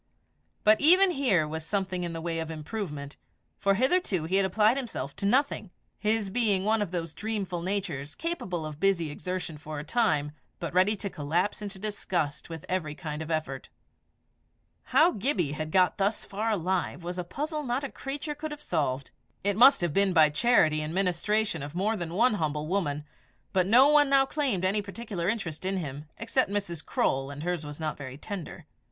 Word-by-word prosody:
But 215 +1 +5
even 365 +5 +6
here 225 - +2
was 160 +1 -4
something 185 0 -2
in 170 - -3
the 165 0 -5
way 165 0 -2
of 160 0 -4
improvement, 155 -3 -5 0.4
for 195 0 +3
hitherto 255 - +1
he 180 +4 +1
had 195 -1 +3
applied 215 +5 +3
himself 215 - -4
to 200 - -1
nothing, 255 -3 +1 0.3
his 215 -2 0
being 205 -4 +2
one 220 0 +2
of 205 - -1
those 165 -2 -3
dreamful 200 -5 -3
natures 170 -7 -3
capable 190 - -3
of 155 -1 -7
busy 170 -4 +2
exertion 180 -1 -5
for 155 0 -7
a 145 - -4
time, 150 -7 +1 0.3
but 170 -2 -5
ready 190 +4 +4
to 200 0 -4
collapse 170 +8 -1
into 200 -1 -6
disgust 180 -8 -2
with 165 -2 -7
every 160 -5 -2
kind 150 0 -5
of 160 - -6
effort. 155 -5 -3 1.2
How 310 +7 +5
Gibbie 200 - 0
had 155 +1 -4
got 180 +2 +3
thus 200 +3 0
far 215 +3 -2
alive 185 -3 -1
was 175 +1 -4
a - - -1
puzzle 300 - -3
not 260 0 -2
a 280 - -4
creature 285 +2 -4
could 305 +1 -5
have 295 -1 -7
solved. 140 - -2 0.3
It 200 0 +1
must 260 +4 +7
have 175 -4 0
been 195 0 +3
by 155 -3 +6
charity 155 -6 +3
and 155 +2 -4
ministration 195 0 +1
of 145 +3 -7
more 205 +5 +1
than 170 -4 -5
one 235 +4 +4
humble 150 -1 -1
woman, 150 -6 -1 0.5
but 185 -2 +3
no 250 +7 +7
one 295 -1 +5
now 275 -1 +5
claimed 265 -11 0
any 200 +3 +2
particular 200 -3 -4
interest 185 -9 -3
in 190 +1 0
him 145 -3 -5
except 230 +1 +1
Mrs. 195 -6 -3
Croale, 135 +1 0
and 145 +1 -7
hers 175 -2 -1
was 145 0 -8
not 155 -2 -3
very 130 -2 -7
tender. 175 -2 -7
185 Hz, 190 wpm, -28 LUFS, 155-220 Hz, 1.2 s, must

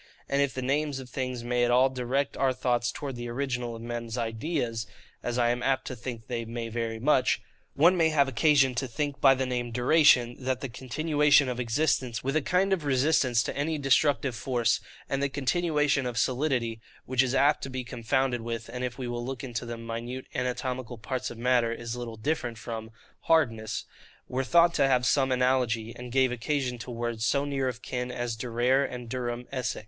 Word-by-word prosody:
And 140 +1 +1
if 140 -2 0
the 130 - -3
names 145 +2 0
of 130 -2 -9
things 125 -1 -3
may 120 0 +1
at 120 - +2
all 125 +2 +5
direct 130 +2 -1
our 135 -1 +2
thoughts 120 0 0
towards 135 -3 -6
the 120 - -4
original 125 -2 -2
of 115 - -9
men's 120 0 -4
ideas, 115 0 -2 0.3
(as 120 0 -2
I 120 -1 +3
am 120 0 -2
apt 130 +2 +1
to 130 - -5
think 120 -1 -7
they 120 -1 -3
may 115 0 -5
very 115 0 -3
much,) 130 0 +3 0.4
one 170 +6 +5
may 165 -2 +3
have 145 -3 +3
occasion 135 0 +4
to 130 +2 -2
think 145 +4 -3
by 135 -1 +7
the 130 0 -1
name 125 -1 -2
DURATION, 125 -1 +4
that 130 -1 -1
the 135 - -4
continuation 145 +3 +2
of 125 -1 -3
existence, 125 -1 0
with 135 +3 -1
a 155 - +3
kind 185 +6 +2
of 175 -5 -1
resistance 130 -4 +2
to - - -4
any 155 +3 -1
destructive 135 -2 +2
force, 120 -2 +1 0.3
and 135 - -1
the 140 - +1
continuation 145 -1 +1
of 120 -2 -4
solidity 125 -2 0 0.2
(which 130 0 +2
is 130 0 0
apt 145 +2 +4
to 135 - -5
be 130 -1 -4
confounded 120 +1 -1
with, 115 0 -5
and 125 0 -4
if 125 -1 -3
we 130 -2 -4
will 120 0 -3
look 130 +2 -5
into 120 -2 -4
the 120 0 -5
minute 115 +3 -5
anatomical 125 -1 -3
parts 130 +3 -3
of 120 - -9
matter, 120 -1 +2
is 115 0 -5
little 120 -2 -6
different 120 -2 -2
from, 110 -1 -6 0.4
hardness) 115 -10 +1 0.4
were 130 +1 -1
thought 170 +5 +5
to 135 - +3
have 125 -2 +2
some 130 0 +3
analogy, 125 -3 +1
and 125 0 -8
gave 130 0 +3
occasion 125 0 -2
to 115 - -8
words 120 -2 -3
so 140 +4 +2
near 135 -2 -1
of 125 -1 -5
kin 125 0 -3
as 120 -2 -3
durare 120 +4 +1
and 125 -1 -7
durum 120 0 -3
esse. 130 -2 -2
125 Hz, 205 wpm, -28 LUFS, 120-135 Hz, 0.4 s, by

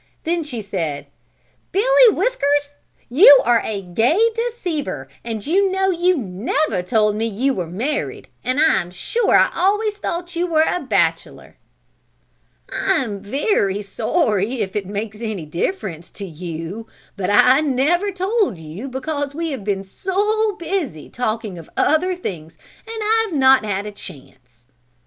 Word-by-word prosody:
Then 335 +1 0
she 250 -7 -5
said: 165 -8 -3 0.7
"Billy - - +5
Whiskers 290 - 0 0.3
you 280 - +8
are 235 -1 +4
a 200 -2 -3
gay 225 - +1
deceiver 350 - -3 0.2
and 225 -3 -5
you 385 +5 +3
know 385 0 +1
you 355 0 +2
never 215 +3 -1
told 210 +2 +1
me 225 +2 -1
you 245 +6 0
were 180 -6 -3
married 240 - -3 0.2
and 255 +2 0
I 315 - +4
am 175 - -9
sure 425 - 0
I - - +4
always 415 +2 +1
thought 350 -3 -4
you 350 +1 0
were 320 -2 +3
a 360 - 0
bachelor." 280 -6 -1 1.1
"I 390 0 0
am 205 -5 -5
very 205 - 0
sorry 220 - 0
if 195 -2 -3
it 200 -3 -2
makes 210 +2 -5
any 215 -8 -4
difference 170 - -3
to 200 - -7
you, 170 +5 -6 0.3
but 190 -2 -2
I 250 +6 +6
never 310 +8 +1
told 385 - 0
you 165 - -8
because 285 +2 -4
we 330 0 -2
have 265 -7 -5
been 195 -1 -1
so 410 - 0
busy 330 - -4
talking 220 -6 -3
of 165 - -13
other 360 +4 +2
things 165 - -7 0.3
and 450 -1 -5
I 450 +1 +2
have 335 -7 -3
not 265 -2 +5
had 205 -1 -2
a 210 - -5
chance." 130 -10 -13
255 Hz, 155 wpm, -20 LUFS, -, 1.1 s, you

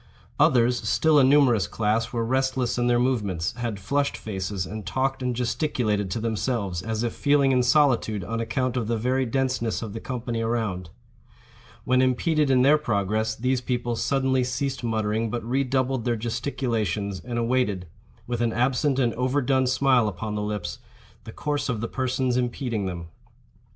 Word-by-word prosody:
Others, 120 0 +3
still 155 -2 +4
a - - +6
numerous 130 -8 +4
class, 110 +3 0
were 115 -2 -1
restless 130 0 0
in 120 - +1
their 120 0 +3
movements, 105 -9 0
had 115 -4 -3
flushed 140 +8 -1
faces, 95 -2 -4
and 110 +2 -6
talked 130 +7 -1
and 125 -1 -1
gesticulated 120 -5 -1
to 90 - -2
themselves, 110 -5 -2
as 110 +2 -2
if 120 - -1
feeling 140 -1 +3
in 125 -1 +3
solitude 125 -6 +2
on 115 +6 -3
account 130 +2 -1
of 120 -4 -1
the 115 0 0
very 130 +3 0
denseness 125 -3 -1
of 105 -3 -6
the 115 - -5
company 120 -2 -4
around. 110 -6 -2 0.9
When 130 0 +3
impeded 145 +4 +2
in 130 -1 +4
their 150 +3 +5
progress, 110 -4 0
these 125 +2 0
people 120 -1 -2
suddenly 130 +1 +1
ceased 130 +2 -2
muttering, 110 0 0
but 120 0 -4
re 135 +3 +1
doubled 130 -1 0
their 120 -1 0
gesticulations, 110 -5 -2
and 120 -1 -4
awaited, 115 -6 0 0.4
with 120 -1 -3
an 115 -1 +1
absent 130 +3 +1
and 120 -4 +2
overdone 130 +1 +1
smile 130 -2 +3
upon 105 +2 -4
the 105 - -2
lips, 105 -10 -4 0.5
the - - -8
course 145 -1 -2
of 120 -4 -1
the 115 - -2
persons 130 -1 -1
impeding 120 -4 -2
them. 85 -2 -6
120 Hz, 170 wpm, -25 LUFS, 110-130 Hz, 0.9 s, a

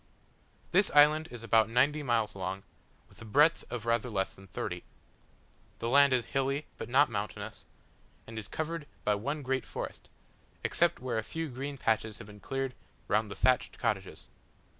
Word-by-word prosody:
This 190 +3 +4
island 150 +2 +6
is 120 -2 -9
about 110 -1 +4
ninety 140 +6 +3
miles 120 -6 +1
long, 95 0 -4 0.4
with - - -18
a - - -7
breadth 150 +9 +4
of 120 -2 -5
rather 115 +1 +1
less 95 -3 -1
than 95 0 -15
thirty. 90 - -4 0.9
The 115 - -2
land 140 +2 +6
is 125 -2 +2
hilly, 135 +2 0
but - - -5
not 140 +4 +5
mountainous, 105 +1 -5 0.6
and 115 -1 -6
is 105 - -8
covered 160 -1 -4 0.2
by 105 - +4
one 140 +9 -2
great 130 -1 0
forest, - - -6 0.5
except - - +2
where 125 -3 -1
a - - -3
few 160 +6 -4
green 140 +2 -5
patches 110 -3 0
have - - -9
been 105 0 -13
cleared 135 +2 -3 0.3
round 110 +1 +2
the 100 - -6
thatched 130 +5 +2
cottages. 105 -6 -2
120 Hz, 170 wpm, -31 LUFS, 110-140 Hz, 0.9 s, island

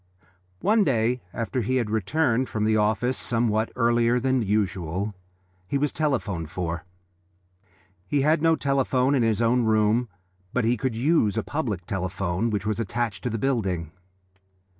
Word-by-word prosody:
One 215 +2 +4
day 125 - +1
after 115 +4 -2
he 130 +4 -1
had 120 -5 0
returned 120 - +1
from 105 -1 -1
the 110 0 +3
office 110 +4 +1
somewhat 115 -2 0
earlier 120 0 +3
than 130 0 +1
usual, 100 -2 -1 0.5
he 140 - 0
was 145 +1 0
telephoned 105 - -1
for. 85 -2 -4 1.2
He 140 +8 +1
had 155 +3 +3
no 165 0 +4
telephone 135 -2 +1
in 135 - +2
his 115 0 +1
own 120 +2 +3
room, 110 +2 +2 0.4
but 125 -3 +1
he 120 +2 +3
could 125 0 -2
use 120 -4 +2
a 110 - 0
public 110 - -3
telephone 95 +2 -2
which 105 -2 -2
was 110 +1 -1
attached 115 0 -2
to - - +1
the 115 - -2
building. 95 - -1
115 Hz, 155 wpm, -25 LUFS, 105-130 Hz, 1.2 s, One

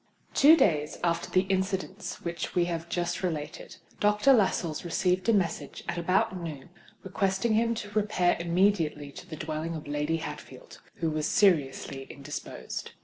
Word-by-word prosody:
Two 310 +4 +7
days 150 - +2
after 170 -1 0
the 185 - +4
incidents 190 0 -2
which 170 0 -4
we 175 -1 +3
have 170 -1 -4
just 175 0 -1
related, 155 -5 -4 0.2
Dr. 210 +6 +4
Lascelles 180 -8 +1
received 180 +3 0
a - - +7
message, 190 -6 -1
at 170 - -2
about 185 +2 +1
noon, 165 -4 -7 0.3
requesting 195 +4 0
him 230 +1 +2
to 205 -2 -6
repair 205 -4 +2
immediately 170 -4 +1
to - - -11
the 160 - -5
dwelling 160 +1 -4
of 155 - -7
Lady 150 +2 0
Hatfield, 165 - -9 0.2
who 165 -1 +1
was 155 0 -1
seriously 140 -7 +2
indisposed. 135 - -7
175 Hz, 150 wpm, -28 LUFS, 155-195 Hz, 0.3 s, Two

